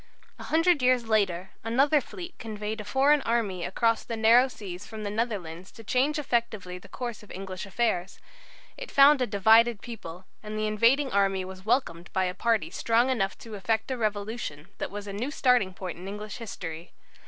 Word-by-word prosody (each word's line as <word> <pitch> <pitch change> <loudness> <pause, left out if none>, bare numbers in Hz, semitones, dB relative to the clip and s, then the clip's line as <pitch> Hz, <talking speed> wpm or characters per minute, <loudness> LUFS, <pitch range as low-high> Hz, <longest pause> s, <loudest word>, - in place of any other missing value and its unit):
A - - -8
hundred 330 -1 +3
years 250 -2 +3
later 195 -4 +1
another 275 +6 +3
fleet 355 +6 -9
conveyed 215 -1 -5
a - - -7
foreign 275 +7 +3
army 220 -8 -1
across 230 +5 +1
the 230 - -5
narrow 230 +4 +6
seas 195 -7 -8
from 220 -1 -7
the 205 - -3
Netherlands 195 -6 -3
to 225 - -12
change 265 +7 +1
effectively 225 -9 -2
the - - -15
course 240 -3 -5
of 210 - -16
English 190 +1 -6
affairs. 195 -3 -1 0.6
It - - -7
found 275 0 +6
a 250 - +2
divided 225 +2 +5
people, 190 -7 -9 0.2
and 215 0 -6
the 215 - 0
invading 235 +6 +3
army 195 -1 +1
was 190 0 -10
welcomed 175 -9 0
by 190 - +2
a 180 - -2
party 210 -4 0
strong 235 +5 +2
enough 195 -6 -1
to 225 - -11
effect 220 +4 -1
a - - 0
Revolution 205 -7 -3
that - - -3
was 205 +1 -7
a 200 - -6
new 230 +7 -3
starting 250 -9 +2
point 185 -2 -7
in 185 - -8
English 210 +1 -6
history. 175 -7 -7
215 Hz, 190 wpm, -27 LUFS, 190-240 Hz, 0.6 s, narrow